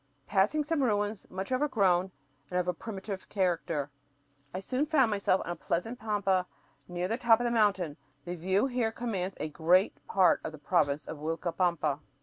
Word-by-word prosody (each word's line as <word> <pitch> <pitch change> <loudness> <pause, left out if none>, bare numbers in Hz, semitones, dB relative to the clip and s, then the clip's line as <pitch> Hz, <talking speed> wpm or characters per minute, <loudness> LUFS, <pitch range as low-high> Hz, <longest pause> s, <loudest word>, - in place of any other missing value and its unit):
Passing 210 +10 +2
some 305 0 0
ruins 205 -4 0
much 190 +5 -5
overgrown 200 -10 +2 0.4
and 180 - 0
of 180 - -1
a 180 - +1
primitive 195 0 -7
character, 165 -6 -1 0.6
I 185 - -4
soon 255 +9 -1
found 270 -7 +3
myself 200 -2 +2
on 175 - -3
a - - -3
pleasant 225 +11 -3
pampa 200 -4 +1 0.4
near 175 0 -2
the 225 +4 -1
top 235 -2 +5
of - - -1
the 240 - +1
mountain. 195 -9 +2 0.3
The 175 - -4
view 185 +3 +1
from 270 - +1
here 245 -3 0
commands 195 -6 -3
"a - - -2
great 170 +5 +3
part 190 -2 +4
of 155 - -5
the - - -8
province 150 -2 +1
of 160 - -7
Uilcapampa." 165 -1 0
190 Hz, 180 wpm, -30 LUFS, 175-225 Hz, 0.6 s, top